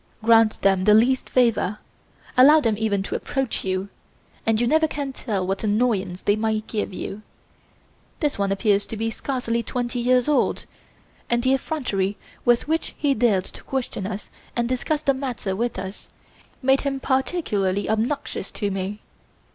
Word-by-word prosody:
Grant 225 -1 +5
them 190 -1 +3
the 210 0 +7
least 250 +4 +3
favour, 230 -5 +2 0.6
allow 290 +5 +8
them 225 -7 +1
even 205 -2 0
to - - -5
approach 270 -3 -2
you, 190 +1 -2 0.6
and 225 -1 +3
you 240 - +2
never 315 +5 +3
can 285 -2 -4
tell 205 -8 -2
what 195 +3 -2
annoyance 205 -4 0
they 205 - +3
may 220 0 0
give 215 -1 -3
you. 195 +2 -6 1.0
This 295 -8 -1
one 200 -1 +1
appears 200 0 +2
to 225 - -6
be 225 +1 -1
scarcely 235 -2 -2
twenty 245 +1 -3
years 250 0 +3
old, 300 - +1 0.6
and 240 0 +1
the 260 +1 +3
effrontery 210 -9 -1 0.3
with 240 +2 +3
which 320 +1 -1
he 290 -2 +2
dared 215 -7 +2
to - - -11
question 245 -7 -3
us 205 0 -6 0.2
and 235 -1 0
discuss 290 +5 -1
the 275 - +3
matter 250 -8 -3
with 235 +1 -2
us 190 +1 -7 0.5
made 265 +1 +4
him 275 -1 -2
particularly 250 - 0
obnoxious 225 0 -1
to 205 -1 -2
me. 195 +2 -4
225 Hz, 165 wpm, -23 LUFS, 200-260 Hz, 1.0 s, allow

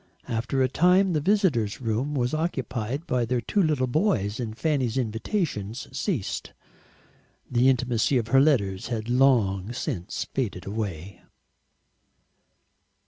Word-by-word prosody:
After 120 +4 0
a - - +3
time 180 +7 +3
the 155 - +1
visitor's 160 - +1
room 125 +5 -1
was 125 0 0
occupied 135 -4 -2
by 125 -5 0
their 120 +1 0
two 160 - 0
little 150 -7 +2
boys, 125 - 0
and 110 -2 -4
Fanny's 135 -7 0
invitations 115 - -2
ceased. 135 - -3 1.0
The 125 +1 +4
intimacy 125 0 +1
of 115 -2 -2
her 135 +2 +5
letters 100 -11 +1
had 115 -1 -3
long 120 -6 +3
since 115 - -4
faded 110 -9 -2
away. 100 -3 -5
125 Hz, 125 wpm, -26 LUFS, 110-145 Hz, 1.0 s, her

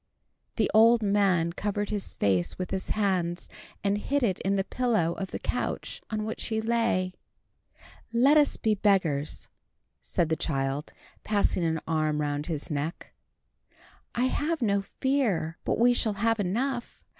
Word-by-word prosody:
The - - +1
old 230 +1 +6
man 195 -5 +2
covered 205 +2 -2
his 205 -2 -4
face 95 -3 +1
with 185 -1 -4
his 190 -1 -3
hands, 185 -4 0 0.4
and 200 0 +1
hid 280 +5 0
it 195 -6 +1
in 195 +1 0
the 195 - +1
pillow 215 -9 0
of 190 +1 -5
the - - -4
couch - - -3
on 215 -1 -2
which 220 - -4
he 220 -1 -1
lay. 220 -5 0 1.0
"Let 255 +6 +5
us 295 -1 +4
be 220 - +1
beggars," 185 -8 +1 0.5
said 165 - -1
the 160 - +2
child, 135 -1 -2 0.3
passing 205 -4 +1
an 160 -1 0
arm 155 -2 0
round 145 0 -2
his 160 0 -4
neck. 150 +4 -4 1.0
"I 245 - +2
have 305 +5 0
no 200 -2 +2
fear 200 - -1
but - - 0
we 245 +2 +5
shall 225 -3 +1
have 225 +3 +1
enough. 240 +6 -2
200 Hz, 155 wpm, -28 LUFS, 165-230 Hz, 1.0 s, old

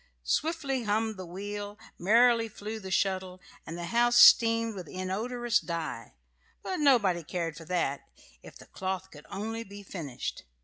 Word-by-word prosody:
Swiftly 280 - -1
hummed 220 +1 0
the 185 -2 -8
wheel, 205 +3 -6 0.2
merrily 230 +4 +4
flew 215 +1 -6
the 190 -2 -8
shuttle, 185 -1 -1 0.3
and 165 - -6
the 175 - -5
house 240 +4 +2
steamed 230 -1 +7
with 185 -5 -8
inodorous 230 +7 -1
dye; 160 - -5 0.5
but 375 - -3
nobody 210 - +3
cared 165 0 -3
for 165 0 -10
that, 160 -5 -1 0.4
if - - -13
the - - -14
cloth 190 0 -4
could 150 -1 -14
only 225 +3 -4
be 200 -1 -11
finished. 155 -10 -6
205 Hz, 150 wpm, -29 LUFS, 180-230 Hz, 0.5 s, steamed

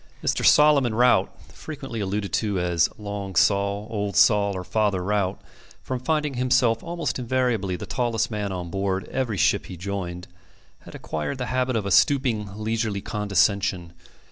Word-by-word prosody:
Mr. - - 0
Solomon 140 -6 +5
Rout 120 -5 +3
(frequently 135 -6 -7
alluded 100 -2 -3
to 105 -4 0
as 85 -2 +2
Long 100 -2 -6
Sol, 100 +2 +2
Old 105 -2 -3
Sol, 100 -2 +4
or 90 - -5
Father 100 -2 0
Rout), 100 -1 -1 0.4
from 130 -1 -3
finding 150 +2 -1
himself 125 -2 +2
almost 170 -5 -3
invariably 120 -6 0
the - - -6
tallest 120 -3 -1
man 105 -2 -3
on 90 -2 -5
board 95 -1 -2
every 120 -6 -2
ship - - +2
he 90 - -8
joined, 90 -1 -5 0.5
had - - -13
acquired 80 - -4
the 125 - -3
habit 130 0 0
of 110 -3 -1
a 100 - -2
stooping, 120 -5 +2
leisurely 110 -2 -2
condescension. 100 -4 0
105 Hz, 155 wpm, -24 LUFS, 95-125 Hz, 0.5 s, Solomon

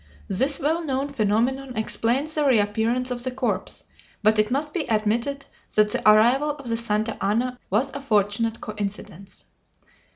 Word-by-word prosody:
This 265 +9 +1
well 320 +4 0
known 275 -1 -2
phenomenon 250 +2 0
explains 245 +7 0
the 305 - 0
reappearance 235 0 +1
of 240 -1 -2
the 255 - -1
corpse, 245 -7 -2 0.4
but 215 0 +4
it 215 - +3
must 295 +4 -2
be 325 -7 -3
admitted 230 +6 0 0.3
that 210 0 +4
the 215 - +3
arrival 245 +8 +4
of 285 -3 -5
the 230 -1 0
Santa 220 -1 0
Ana 245 +5 0
was 245 +8 +1
a 280 - -6
fortunate 220 -2 +1
coincidence. 200 -2 -7
235 Hz, 155 wpm, -24 LUFS, 215-270 Hz, 0.4 s, but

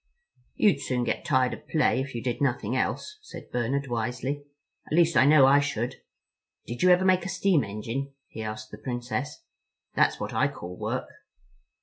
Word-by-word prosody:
"You'd 195 -10 +3
soon 125 -3 -1
get - - -2
tired 130 -5 +2
of - - -10
play 155 -4 +2
if 135 -2 -6
you 115 - -4
did 125 +1 -2
nothing 125 -4 0
else," 425 - -2
said 430 - -11
Bernard 130 +4 -1
wisely. 130 +4 -3 0.4
"At - - -5
least 170 0 +4
I 130 - +6
know 145 -2 +7
I 140 +2 +6
should. 125 -4 -2 0.7
Did 120 +1 -6
you 185 - +5
ever 180 +1 +5
make 185 -1 +4
a 185 - -4
steam 185 -3 +2
engine?" 115 +7 -4 0.2
he 110 - -8
asked 110 0 -6
the - - -9
Princess. 125 +3 -4 0.5
"That's - - +2
what - - -4
I - - +3
call 90 +1 -8
work." - - -3
130 Hz, 185 wpm, -27 LUFS, 120-150 Hz, 0.7 s, know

